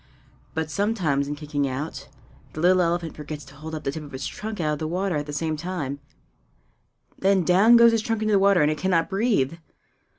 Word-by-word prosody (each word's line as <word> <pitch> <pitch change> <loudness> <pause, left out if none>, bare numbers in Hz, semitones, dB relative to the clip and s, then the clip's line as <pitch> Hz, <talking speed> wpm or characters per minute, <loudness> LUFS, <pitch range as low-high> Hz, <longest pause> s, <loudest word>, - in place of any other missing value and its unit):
But 160 -1 -2
sometimes, 170 -8 0
in 145 - -3
kicking 145 -1 -2
out, 135 +4 -5 0.5
the - - -7
little 180 +2 +4
elephant 170 -1 -1
forgets 150 -1 -7
to 140 - -15
hold 160 +2 -7
up 155 - -6
the 135 - -1
tip 155 - -6
of 145 -2 -11
its 130 - -5
trunk 215 -1 -6
out 155 -2 0
of 150 - -4
the 155 - -2
water 180 0 -1
at 145 0 -4
the - - -5
same 155 +2 -2
time; 150 -4 -4 1.2
then 190 -1 +3
down 195 +8 +6
goes 235 0 +7
its 225 - +2
trunk 225 0 -2
into 215 - +1
the 200 - +4
water, 195 -4 +4
and 150 - +3
it 155 - -4
cannot 185 0 +1
breathe! 195 - +1
165 Hz, 220 wpm, -24 LUFS, 150-195 Hz, 1.2 s, goes